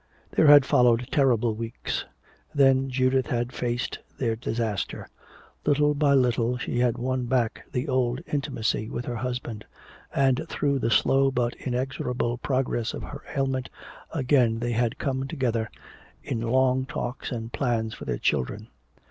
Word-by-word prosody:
There 155 - +4
had 145 -2 +9
followed 125 -3 +3
terrible 120 -5 +3
weeks. 115 +1 -4 0.5
Then 135 -1 +4
Judith 130 0 +2
had 120 0 -1
faced 120 0 -2 0.2
their 115 -4 0
disaster. 110 -3 -3 0.6
Little 150 +1 +3
by 140 -1 +3
little 125 -2 +2
she 125 -1 -2
had 120 -1 +2
won 130 +1 -1
back 120 -2 0
the 125 +4 -2
old 130 -2 +1
intimacy 115 -7 -1
with 120 - -4
her 120 -1 -3
husband; 120 -2 -4 0.5
and 135 +2 +2
through 140 -2 0
the 120 - 0
slow 135 +4 +4
but 120 -2 0
inexorable 125 -2 -2
progress 130 -4 -1
of - - -6
her 145 0 -8 0.2
ailment, 130 -2 0 0.4
again 130 -6 +2
they 120 +1 -2
had 120 0 0
come 135 -1 -2
together 115 -5 -1 0.5
in 115 - -3
long 130 +2 +2
talks 125 +1 -4
and 115 -1 -5
plans 115 -5 0
for - - -9
their 60 -2 -2
children. 65 - -1
125 Hz, 150 wpm, -26 LUFS, 120-135 Hz, 0.6 s, had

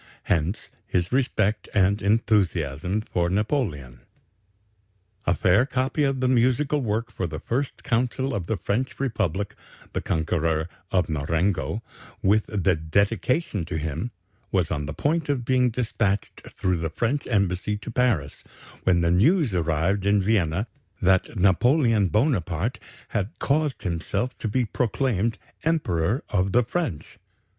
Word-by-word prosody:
Hence 85 +6 -1 0.2
his 90 -1 0
respect 110 -5 +1
and 100 +1 +3
enthusiasm 95 - +1
for 85 -5 -1
Napoleon. 95 - -1 1.3
"A 90 - +3
fair 100 +8 +3
copy 130 +3 -1
of 135 -2 +1
the 130 - +2
musical 130 +4 +2
work 115 0 -1
for 95 -5 -3
the 80 -1 -5
First 130 +3 -3
Consul 125 +2 0
of 90 -4 -3
the 110 - 0
French 120 +7 -2
Republic, 105 - -1 0.4
the - - -1
conqueror 80 -1 0 0.2
of 90 -2 +2
Marengo, 85 +8 -1 0.4
with 105 +2 +3
the 100 -5 +1
dedication 100 - 0
to 80 - -4
him, 80 +8 -3 0.4
was 90 -4 +1
on 75 -2 -2
the 75 - -4
point 155 +1 0
of 130 -4 0
being 125 0 +3
despatched 110 -4 -2
through 90 -1 -1
the 80 0 -2
French 120 - -1
embassy 100 -1 0
to 105 - -8
Paris, 110 - 0 0.4
when 90 -2 +4
the 85 0 +2
news 140 - +3
arrived 85 +4 +1
in 100 0 +4
Vienna 95 -2 +1 0.3
that 95 +4 +2
Napoleon 110 - +4
Bonaparte 105 - 0 0.3
had 100 +2 -2
caused 150 0 0
himself 100 +7 -2
to - - -2
be 120 +4 +1
proclaimed 115 -1 0 0.3
Emperor 120 - +1
of 95 -1 0
the 125 - +5
French. 125 - -4
105 Hz, 135 wpm, -25 LUFS, 90-125 Hz, 1.3 s, the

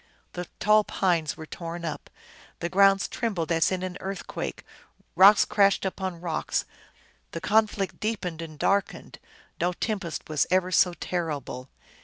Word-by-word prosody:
The 175 -1 -5
tall 215 0 +5
pines 170 -7 0
were 160 - -8
torn 170 +1 -6
up, 155 - -5 0.5
the 170 - -3
ground 195 +1 +4
trembled 190 -9 -2
as 165 +2 +3
in 185 -1 -2
an 185 -1 -4
earthquake, 195 0 -5 0.5
rocks 200 +2 +8
crashed 200 -1 +3
upon 190 -2 -3
rocks, 170 -3 -2 0.7
the - - -3
conflict 210 0 +1
deepened 185 -7 -3
and 155 -2 -8
darkened; 200 +6 -1 0.4
no 175 +1 +1
tem 215 +3 -2
pest 170 -4 -6
was 155 -2 +1
ever 185 0 +2
so 180 -1 +4
terrible. 145 -8 -4
180 Hz, 145 wpm, -26 LUFS, 165-195 Hz, 0.7 s, rocks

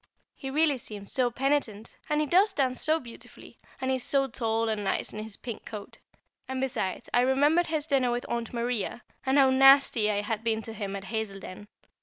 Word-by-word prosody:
He 270 - -6
really 295 -1 +2
seemed 205 -3 -7
so 255 +1 +2
penitent, 240 -4 -1
and 300 0 +1
he - - +1
does 380 +7 +4
dance 260 -6 0
so 315 +1 +2
beautifully, 240 -5 -13 0.2
and 260 0 -1
he 260 - +1
is 250 - -4
so 275 -1 +2
tall 230 -3 -1
and 215 -2 -1
nice 195 - 0
in 215 - -5
his 220 -2 -7
pink 235 -3 -7
coat; 210 -2 -9 0.5
and, 260 0 -3
besides, 245 -8 -2
I 245 - +5
remembered 290 +7 +3
his 310 -2 -1
dinner 270 -5 +2
with 240 0 -2
Aunt 235 -1 -3
Maria, 240 -1 -2 0.2
and 265 +2 +3
how 270 -2 +6
nasty 270 -4 +6
I 205 -1 0
had 215 +1 -3
been 225 -1 0
to 225 - -7
him 200 -3 -5
at 195 - -6
Hazeldene! 200 -2 -6
245 Hz, 205 wpm, -28 LUFS, 220-275 Hz, 0.5 s, how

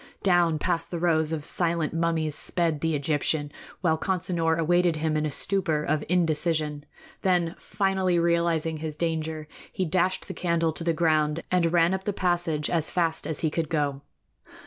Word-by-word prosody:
Down 175 -4 +3
past 165 +2 -1
the 175 - -4
rows 160 -2 +1
of 155 -2 -3
silent 170 -3 0
mummies 165 -2 0
sped 165 -1 0
the 160 -1 0
Egyptian, 145 0 0 0.3
while 160 -4 +1
Consinor 170 -3 0
awaited 175 +1 +2
him 155 0 -1
in 155 0 0
a - - -4
stupor 165 -2 +1
of 150 0 0
indecision. 155 -3 0 0.4
Then, 175 -3 +1
finally 190 -3 0
realizing 170 -2 +1
his 155 -1 -5
danger, 160 -1 -2 0.2
he 185 - -2
dashed 185 +2 0
the 190 - -5
candle 165 -2 0
to 165 - -6
the 165 0 +1
ground 155 -1 +1
and 175 -2 +2
ran 170 +1 +3
up 190 0 -3
the 205 - -1
passage 175 -5 0
as 165 -3 +1
fast 165 -3 -1
as 160 - -3
he 160 - 0
could 160 -1 -2
go. 145 -3 -1
165 Hz, 170 wpm, -26 LUFS, 155-175 Hz, 0.4 s, Down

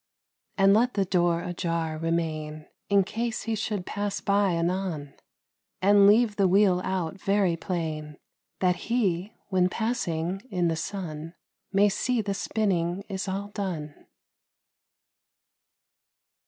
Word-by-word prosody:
And 195 0 +6
let 240 +4 +3
the 200 -2 +2
door 175 -2 +1
ajar 170 -2 -2
remain, 155 -2 -2 0.2
In 200 -1 +5
case 225 +4 -3
he 225 - -2
should 210 -3 -2
pass 205 -1 -2
by 200 -2 +2
anon; 170 -4 -2 0.7
And 200 +1 +6
leave 215 0 +4
the 195 -2 +4
wheel 185 -1 +4
out 190 0 -2
very 195 -4 +2
plain, 155 -4 -4 0.4
That 180 -1 +1
HE, 200 -5 +1 0.2
when 185 -2 +3
passing 190 -5 -2
in 180 -4 +1
the 165 - 0
sun, 165 -2 -5 0.4
May 200 +1 +5
see 245 +4 0
the 205 -2 -1
spinning 195 -3 -1
is 190 0 -3
all 195 +2 -3
done. 180 -8 -4
190 Hz, 125 wpm, -27 LUFS, 170-205 Hz, 0.7 s, And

